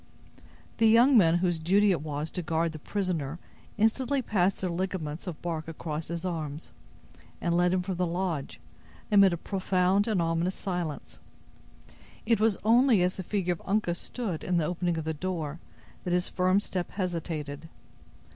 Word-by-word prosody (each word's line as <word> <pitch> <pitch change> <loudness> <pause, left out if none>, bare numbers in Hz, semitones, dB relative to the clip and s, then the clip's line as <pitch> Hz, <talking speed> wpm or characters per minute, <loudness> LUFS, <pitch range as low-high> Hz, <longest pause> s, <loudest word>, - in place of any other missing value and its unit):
The 225 - +5
young 240 +5 +6
men 170 -7 +6
whose 175 -2 0
duty 195 +5 +4
it 170 -6 0
was 150 0 -4
to 180 - -3
guard 165 0 0
the 155 - -8
prisoner 170 -5 -2 0.4
instantly 250 +5 +1
passed 195 -4 +1
their 185 - -1
ligaments 170 -3 -3
of 170 -4 -5
bark 160 -2 -3
across 160 -1 -5
his 170 +2 -4
arms, 155 -3 -4 0.7
and 170 -1 0
led 175 0 +3
him 185 -1 +1
from 185 -1 -3
the 180 0 +1
lodge, 170 -4 -3 0.5
amid 200 -2 +7
a 170 - -1
profound 190 +2 +1
and 215 -5 +1
ominous 165 +2 0
silence. 175 -6 -4 1.1
It 225 -1 +3
was 215 -2 +3
only 230 -2 +5
as 180 +1 0
the 190 - -4
figure 180 -1 0
of 165 - -10
Uncas 195 -4 0
stood 210 -10 -4
in 180 -1 0
the 165 - +1
opening 175 0 -1
of 160 - -3
the 160 - -1
door 165 -2 -4 0.4
that 180 - -1
his 180 0 +1
firm 185 +1 +2
step 185 -3 -3
hesitated. 160 -5 -4
180 Hz, 170 wpm, -28 LUFS, 165-195 Hz, 1.1 s, amid